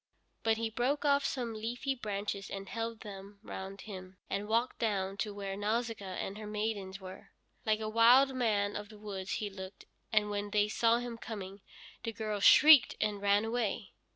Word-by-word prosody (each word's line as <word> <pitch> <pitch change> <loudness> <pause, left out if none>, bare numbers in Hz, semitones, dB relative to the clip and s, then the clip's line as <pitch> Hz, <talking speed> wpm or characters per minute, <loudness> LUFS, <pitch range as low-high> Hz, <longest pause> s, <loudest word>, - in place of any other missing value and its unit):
But 225 -1 +2
he 225 0 -2
broke 260 +6 0
off 280 -1 +4
some 245 -5 -2
leafy 240 +5 -2
branches 205 -4 -4
and 195 0 -6
held 230 -1 -4
them 200 -1 -9
round 190 +1 -7
him, 185 -3 -9
and 200 +1 -2
walked 230 +3 0
down 195 -4 0
to 210 - -2
where 200 -1 -5
Nausicaa 210 -2 -2
and 200 +3 -4
her 215 - -7
maidens 210 -2 -3
were. 185 -1 -10 0.4
Like 215 0 +2
a 215 - -2
wild 240 +5 +6
man 210 -5 +1
of 205 0 -5
the 215 - -12
woods 195 -3 -5
he 210 - -2
looked, 190 0 -9 0.3
and 210 -2 +2
when 205 0 -2
they 205 0 +2
saw 230 +2 +3
him 240 -1 -5
coming 200 -3 -7 0.4
the 230 - -4
girls 210 -2 -2
shrieked 300 -4 +8
and 210 -2 -1
ran 205 +1 +3
away. 225 -4 -2
210 Hz, 180 wpm, -32 LUFS, 200-230 Hz, 0.4 s, shrieked